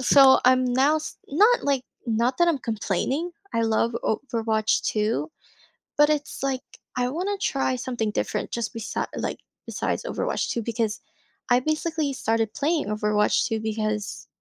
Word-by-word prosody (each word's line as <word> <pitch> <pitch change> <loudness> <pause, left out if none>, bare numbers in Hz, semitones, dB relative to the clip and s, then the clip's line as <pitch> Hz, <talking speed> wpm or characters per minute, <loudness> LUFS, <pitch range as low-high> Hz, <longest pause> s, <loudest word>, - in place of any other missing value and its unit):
So 265 +1 +7
I'm 255 0 +5
now 265 +5 +3 0.3
not, 425 - +4
like 275 -3 +1 0.3
not 235 +3 +1
that 345 - +5
I'm 320 - +2
complaining. 240 - -1 0.2
I 230 - +1
love 225 +1 +1
Overwatch 220 -2 0
2, 220 +8 0 0.7
but 295 0 +6
it's 295 -1 -1
like 265 -2 0 0.3
I 250 0 0
wanna 370 +8 -2
try 275 -9 0
something 240 -3 -2
different, - - -2
just, 235 0 -3
besid 230 -2 -3
like, - - -3 0.3
besides - - -2
Overwatch - - -2
2 235 - -1
because 225 -1 -2 0.5
I 245 - +6
basically 310 +1 -1
started 225 -3 0
playing 310 +2 0
Overwatch 210 0 +2
2 225 - -1
because 215 0 -3
250 Hz, 145 wpm, -25 LUFS, 220-285 Hz, 0.7 s, So